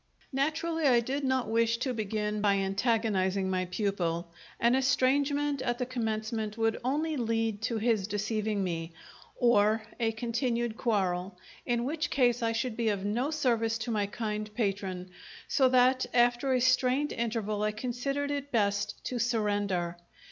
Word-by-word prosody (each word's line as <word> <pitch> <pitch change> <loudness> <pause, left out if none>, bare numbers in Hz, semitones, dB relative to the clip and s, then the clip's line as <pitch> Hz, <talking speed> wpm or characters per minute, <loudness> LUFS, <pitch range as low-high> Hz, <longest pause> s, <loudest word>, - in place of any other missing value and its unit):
Naturally, 315 +3 0
I 245 -3 +5
did 270 +5 -2
not 260 -3 +1
wish 230 +1 +2
to 255 +1 -2
begin 210 -1 -2
by 200 -1 +3
antagonizing 195 -1 +1
my 185 0 0
pupil 175 -3 -2 0.3
an 235 +1 +4
estrangement 280 +2 +2
at 240 -2 -1
the 250 - -1
commencement 220 -3 -3
would 225 0 +1
only 305 +5 0
lead 225 -3 -1
to 230 0 -1
his 220 -3 +1
deceiving 210 0 -1
me, 165 -2 -3 0.4
or 220 -2 +3 0.2
a 225 -1 +2
continued 235 0 -1
quarrel, 190 -6 -1 0.3
in 240 -1 +1
which 305 +3 -2
case 245 -3 +2
I 230 -1 +1
should 230 0 -2
be 230 -1 +1
of 200 -2 -2
no 240 +7 0
service 235 -7 +1
to 235 +1 -4
my 210 -2 0
kind 215 0 -4
patron, 195 -4 -2 0.4
so 265 -3 +3
that 255 0 +4
after 240 +2 +3
a 255 -1 +2
strained 255 +3 +2
interval 220 -3 -2
I 215 0 +1
considered 255 +6 -2
it 285 0 -4
best 205 -2 0
to 250 - -2
surrender. 205 -7 0
230 Hz, 155 wpm, -30 LUFS, 205-255 Hz, 0.4 s, I